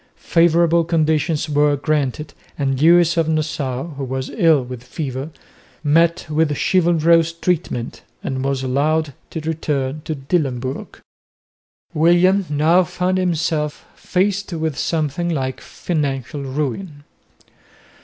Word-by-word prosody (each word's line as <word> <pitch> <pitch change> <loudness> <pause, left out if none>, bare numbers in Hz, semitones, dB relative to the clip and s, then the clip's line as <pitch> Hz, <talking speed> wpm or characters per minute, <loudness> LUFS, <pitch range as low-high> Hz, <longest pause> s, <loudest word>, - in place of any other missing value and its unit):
Favourable 170 0 +3
conditions 160 -1 +1
were 145 -1 +2
granted 145 0 -2 0.2
and 135 -2 -1
Lewis 170 +1 +5
of 165 -1 +2
Nassau, 150 -5 -1
who 140 -3 -6
was 130 0 -4
ill 165 - +3
with 125 -1 -8
fever, 135 +1 -5 0.5
met 165 +3 +3
with 155 -1 0
chivalrous 170 -2 +3
treatment 165 -8 -2 0.2
and 130 -1 -3
was 135 -1 -1
allowed 145 +3 0 0.2
to 160 - -5
return 150 -3 -2
to 155 - -3
Dillenburg. 135 -3 -3 0.9
William 175 +4 +3
now 155 +5 +3
found 180 +2 -1
himself 160 -4 -1
faced 195 +1 -1
with 160 -3 -2
something 160 +2 -1
like 130 -5 -2
financial 145 -4 -3
ruin. 145 +3 -4
155 Hz, 115 wpm, -20 LUFS, 140-170 Hz, 0.9 s, Lewis